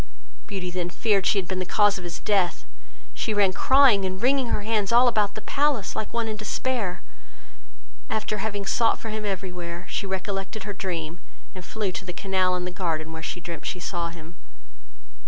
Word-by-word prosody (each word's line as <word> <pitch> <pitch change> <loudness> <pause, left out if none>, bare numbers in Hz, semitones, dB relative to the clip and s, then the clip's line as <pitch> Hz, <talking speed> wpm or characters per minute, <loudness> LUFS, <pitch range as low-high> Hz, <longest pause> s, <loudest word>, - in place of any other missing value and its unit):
Beauty 185 -3 -3
then 175 -1 -2
feared 200 0 +2
she - - +3
had 190 -3 0
been 185 0 -2
the - - 0
cause 205 +1 +3
of - - -9
his 175 -1 -4
death; 180 -11 +1 0.5
she 215 - -1
ran 200 -2 +4
crying 260 -4 +6
and 185 0 -2
wringing 260 +2 +3
her 210 - 0
hands 215 -2 +1
all 240 +2 +7
about 210 -4 +2
the 215 - -5
palace, 285 -7 +1
like 215 - -3
one 235 -1 0
in 215 - -2
despair; 215 -3 -2 1.1
after 215 -1 -1
having 205 -1 -2
sought 230 +3 +3
for 225 - -6
him 215 0 -3
every 190 -2 -2
where, 175 0 -6
she 200 - -2
recollected 195 +2 -3
her 205 0 -4
dream, 175 -3 -4 0.3
and 185 - -8
flew 210 0 -2
to 185 - -5
the 180 -1 -6
canal 185 -1 +1
in 180 0 -2
the 180 - -3
garden, 160 -4 -2
where 160 - -6
she 175 - -4
dreamed 170 -1 -6
she 180 - -3
saw 170 -1 -2
him. 165 0 -11
195 Hz, 200 wpm, -26 LUFS, 180-215 Hz, 1.1 s, all